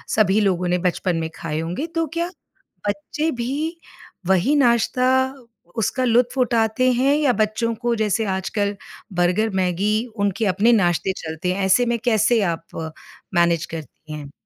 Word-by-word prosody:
सभी 210 -1 +4
लोगों 180 -3 +1
ने 180 0 +2
बचपन 180 0 0
में 160 -1 -2
खाए 155 -1 -4
होंगे 175 - -3
तो 330 - +1
क्या 340 +1 -1 0.6
बच्चे 205 +10 -2
भी 295 +8 -2 0.5
वही 190 +10 +3
नाश्ता 250 -1 +3 0.7
उसका 235 +4 0
लुत्फ़ 245 +2 +2
उठाते 235 +1 +2
हैं 270 +4 +3
या 290 -4 +2
बच्चों 225 +1 0
को 235 +1 -1
जैसे 215 0 0
आजकल 200 +1 -1 0.4
बर्गर 180 +5 +2
मैगी, 195 +5 +1
उनके 205 0 0
अपने 205 +5 +3
नाश्ते 190 -2 +2
चलते 160 +3 -3
हैं 195 +1 -1
ऐसे 215 +6 +4
में 235 0 0
कैसे 225 0 +3
आप 165 -1 -6 0.4
मैनेज 170 -1 +3
करती 155 0 -9
हैं? 145 -2 -8
210 Hz, 150 wpm, -22 LUFS, 180-240 Hz, 0.7 s, सभी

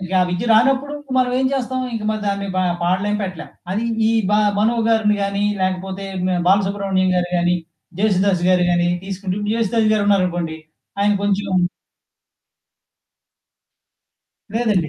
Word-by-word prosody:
మనకా 185 0 -1
విద్య 180 +5 -2
రానప్పుడూ 270 +6 +3 0.2
మనవేం 255 +1 +2
చేస్తాం, 260 -1 -2
ఇంక 220 -2 -4
మరి 215 0 -2
దాన్ని 200 0 -1
బా 185 - +2 0.2
పాడలేం 190 +4 0
పెట్టలేం. 185 -4 -6 0.2
అది 215 +5 -1 0.2
ఈ - - +2 0.2
బ - - +1 0.3
'మనో' 230 +3 +2
గారిని 220 -2 +3
గానీ, 200 +1 -1 0.2
లేకపోతే 190 +1 -3 0.2
హ్మ్, 185 0 0
'బాలసుబ్రహ్మణ్యం' 195 -1 +2
గారు 175 0 -1
గానీ, 175 +1 +2 0.4
'జేసుదాసు' 195 -3 +2
గారు 180 -1 +3
గానీ 175 0 +2 0.2
తీసుకుంటే, 195 0 -4
'జేసుదాసు' 225 -1 +1
గారున్నారనుకోండి, 180 -6 0 0.4
ఆయన 205 +1 +3
కొంచుం 195 -3 +1 2.9
లేదండి. 210 -8 +1
200 Hz, 125 wpm, -20 LUFS, 185-215 Hz, 2.9 s, రానప్పుడూ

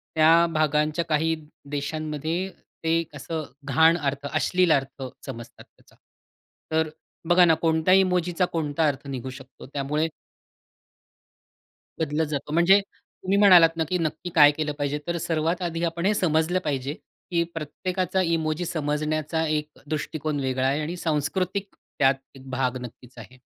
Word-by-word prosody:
त्या 165 +2 +6
भागांच्या 155 +1 +1
काही 160 +1 +2 0.4
देशांमध्ये 155 +4 -3 0.3
ते 165 +1 +2
असं 155 +3 -4 0.2
घाण 160 +5 +4
अर्थ, 140 -3 -3
अश्लील 180 +2 +2
अर्थ 135 -1 0 0.2
समजतात 120 -4 -9
त्याचा. - - -26 0.8
तर 160 0 +1 0.4
बघा 175 0 +7
ना 165 - +5
कोणत्या 160 +2 +3
इमोजीचा 180 -1 +3
कोणता 155 -1 0
अर्थ 140 0 -3
निघू 130 -1 -5
शकतो 135 0 -12
त्यामुळे 150 +3 0 1.9
बदलत 160 0 0
जातो. 150 0 -4
म्हणजे 175 +5 +6
तुम्ही 195 0 -5
म्हणालात 175 -5 +7
ना, 160 - +2
की 185 - +1
नक्की 165 +1 -3
काय 145 -2 +8
केलं 150 0 -2
पाहिजे 145 +1 -1
तर 170 - -1
सर्वात 165 +2 -1
आधी 165 +1 -4
आपण 170 +1 -2
हे 210 - +4
समजलं 175 -1 +1
पाहिजे, 140 -1 -2 0.4
की 170 -1 +2
प्रत्येकाचा 185 +4 -2
इमोजी 165 0 0
समजण्याचा 155 +1 -1
एक 150 0 -3
दृष्टिकोन 155 -1 -3
वेगळा 130 -1 0
आहे 140 +3 0
आणि 170 +4 -4
सांस्कृतिक 180 +5 -2
त्यात 135 -1 +1 0.2
एक 135 0 -12
भाग 130 0 -1
नक्कीच 125 +1 -11
आहे. 120 +3 -12
155 Hz, 140 wpm, -25 LUFS, 145-170 Hz, 1.9 s, काय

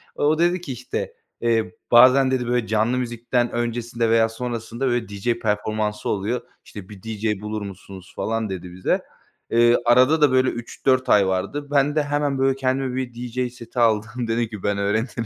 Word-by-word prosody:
O 155 +2 +1
dedi 175 +1 +2
ki, 150 -6 -6
işte, 125 +1 -5 0.3
eee, 115 -5 0 0.2
"Bazen" 130 +2 +7
dedi, 125 -2 0
"böyle, 120 -2 0
canlı 110 +3 +1
müzikten 120 0 -1
öncesinde 120 0 -2
veya 115 0 +4
sonrasında, 120 +2 -4
böyle, 120 -2 0
DJ 100 +4 -1
performansı 105 0 -2
oluyor. 105 +5 -1 0.2
İşte, 100 -3 -10
bir 100 -3 -12
DJ 110 -2 -2
bulur 105 0 -4
musunuz?" 95 -1 -10
falan 115 -1 -2
dedi 90 -2 -6
bize. 90 +1 0 0.5
Eee, 120 +1 +5
arada 130 +6 +5
da, 145 -3 +5
böyle, 130 0 +3
3-4 130 +2 -1
ay 100 -2 +5
vardı. 100 +11 -2
Ben 145 +1 +2
de 155 - +2
hemen, 145 -1 -1
böyle, 135 0 +2
kendime 130 -1 -1
bir 130 -2 -3
DJ 125 +1 -3
seti 120 0 -7
aldım, 115 +1 +1
dedim 115 +1 0
ki, 105 -3 -9
"Ben 100 0 0
öğrenirim." 110 +4 -1
120 Hz, 175 wpm, -22 LUFS, 110-130 Hz, 0.5 s, Bazen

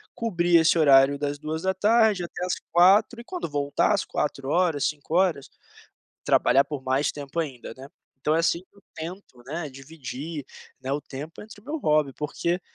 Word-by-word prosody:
cobrir 175 -6 +1
esse 160 +1 +3
horário 140 -1 +6
das 145 0 -2
14h 190 +6 +1
até 175 +1 -5
às 180 - -1 0.2
16h. 200 +7 +5
E - - -8
quando 360 - -5
voltar 145 -1 +1
às - - 0
16h, 145 +1 0
17h, 155 +1 0 0.8
trabalhar 135 +3 +4
por 140 -2 -6
mais 130 +3 +1
tempo 145 +3 -7
ainda, 130 -8 -6
né. 135 +2 -11 0.3
Então 155 +3 +1
é 165 - +3
assim 170 - +2
que 190 - -26
eu 200 - -20
tento, 160 -6 -9
né, 155 0 -5
dividir, 140 +2 -7 0.4
né, 135 +1 -3
o 145 - -1
tempo 145 +4 -9
entre 210 -1 -13
o - - -27
meu 305 +4 -4
hobby. 150 - +2
Porque 170 +5 -2
155 Hz, 170 wpm, -25 LUFS, 140-180 Hz, 0.8 s, horário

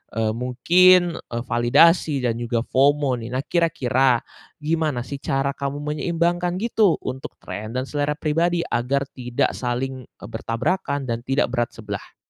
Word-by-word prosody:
eee, 110 -1 +1
mungkin, 170 +9 +4
eee, 120 0 -6
validasi 135 +5 +3
dan 115 -1 0
juga 120 -1 -1
FOMO 135 -1 +2
nih. 115 +2 -6
Nah 130 - -1
kira-kira, 130 -7 +1 0.4
gimana 155 -5 0
sih 140 +1 -7
cara 135 0 0
kamu 140 +1 -4
menyeimbangkan 170 +3 0
gitu 220 -6 +3
untuk 130 +1 -6
trend 110 +5 -6
dan 130 - 0
selera 145 +2 -2
pribadi 170 +3 0
agar 130 +4 0
tidak 125 -2 -1
saling, 130 0 -4
eee, 100 - -13
bertabrakan 140 +6 -2
dan 115 -2 -2
tidak 135 -2 +1
berat 120 -2 -1
sebelah? 105 -3 -7
135 Hz, 145 wpm, -22 LUFS, 120-160 Hz, 0.4 s, mungkin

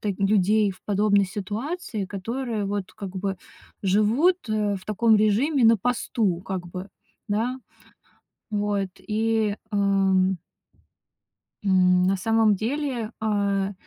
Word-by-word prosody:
так 205 -2 -2
людей 205 +1 +3
в 185 - -13
подобной 205 0 +3
ситуации, 215 - -4
которые, 225 +3 -3
вот, 200 -1 -3
как 195 -3 -8
бы, 190 0 -2 0.5
живут, 215 - +3
э, 210 -2 0
в 185 - -11
таком 220 +1 +3
режиме, 235 +7 +2
на 225 0 +6
посту, 215 -4 -1
как 185 -2 -5
бы, 185 +3 -7 0.4
да. 235 +5 -1 0.9
Вот 205 -2 -1
и, 215 +1 0 0.2
ам 195 -2 +2 1.3
м, 180 -2 +4
на 195 +1 +2
самом 225 +1 +3
деле, 245 0 -2
а 200 -2 0
205 Hz, 115 wpm, -24 LUFS, 195-225 Hz, 1.3 s, на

